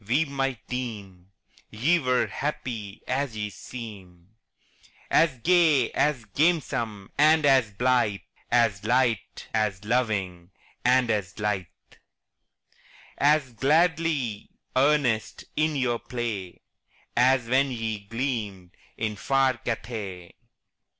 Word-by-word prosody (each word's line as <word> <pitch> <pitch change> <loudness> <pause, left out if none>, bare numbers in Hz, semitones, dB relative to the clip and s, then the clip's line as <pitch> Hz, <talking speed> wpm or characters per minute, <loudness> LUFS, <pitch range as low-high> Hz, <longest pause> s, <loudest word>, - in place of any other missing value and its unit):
we 140 +8 +2
might 135 -5 -3
deem 100 -8 -6 0.4
Ye 145 +12 +2
were 125 -4 +2
happy 115 -8 -5
as 130 -3 -2
ye 105 -1 -3
seem 95 -8 -10 0.8
As 160 -6 +4
gay, 160 -8 +4
as 140 -6 0
gamesome, 120 - 0
and 155 0 +5
as 130 -5 +4
blithe, 120 -3 +1 0.3
As 115 -5 +2
light, 120 -2 0
as 105 -3 -1
loving, 100 -7 -1 0.3
and 125 -1 +3
as 100 -3 -2
lithe, 105 -4 -1 1.5
As 145 -3 +3
gladly 150 -4 +1 0.3
earnest 130 -5 +1
in 155 0 +1
your 125 -4 0
play, 110 -7 -5 0.5
As 125 0 +3
when 135 +3 +3
ye 115 -4 -3
gleamed 105 -5 -4 0.3
in 110 -1 -2
far 135 +3 +1
Cathay. 105 -7 -5
120 Hz, 105 wpm, -26 LUFS, 105-135 Hz, 1.5 s, and